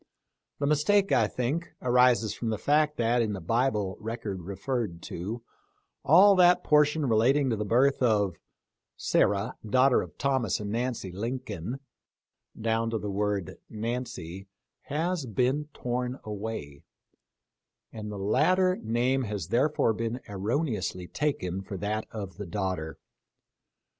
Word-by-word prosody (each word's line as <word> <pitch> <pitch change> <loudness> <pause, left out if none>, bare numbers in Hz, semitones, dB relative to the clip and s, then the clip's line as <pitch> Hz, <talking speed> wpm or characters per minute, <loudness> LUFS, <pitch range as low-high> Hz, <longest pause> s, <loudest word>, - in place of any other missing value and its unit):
The 140 - -1
mistake, 185 +7 +3
I 120 -6 +4
think, 135 +10 -3
arises 125 -3 +3
from 115 - -3
the 110 - -1
fact 150 +5 +2
that, 120 +1 +2
in 110 -2 0
the 100 - -4
Bible 105 0 0
record 110 -4 -5
referred 100 +1 -3
to, 110 +7 -5 0.6
all 195 +6 +7
that 180 0 +5
portion 150 0 +3
re 115 -4 +2
lating 130 +4 +3
to - - +1
the 105 0 -3
birth 130 +6 +3
of 105 -7 +2 0.3
" - - -59 0.2
Sarah, 100 +4 +1
daughter 130 +4 +4
of - - -9
Thomas 130 -8 0
and 105 -1 -4
Nancy 120 -4 -2
Lin 115 +8 -3
coln," 120 - -6 0.8
down 115 +1 0
to 115 - -1
the 105 -1 -4
word 100 -2 -2
Nancy 110 -5 -5 0.4
has 160 0 -1
been 130 +6 +1
torn 125 0 -3
away, 105 -9 -6 1.1
and 105 -1 -6
the 105 - -6
latter 185 - +2
name 125 +4 +1
has 100 -6 -4
therefore 125 -1 +2
been 115 +3 -3
erroneously 105 - -2
taken 95 -7 -2
for 95 0 -7
that 105 +3 -2
of 100 -4 -7
the 100 -2 -6
daughter. 90 -4 -3
115 Hz, 140 wpm, -28 LUFS, 100-135 Hz, 1.1 s, all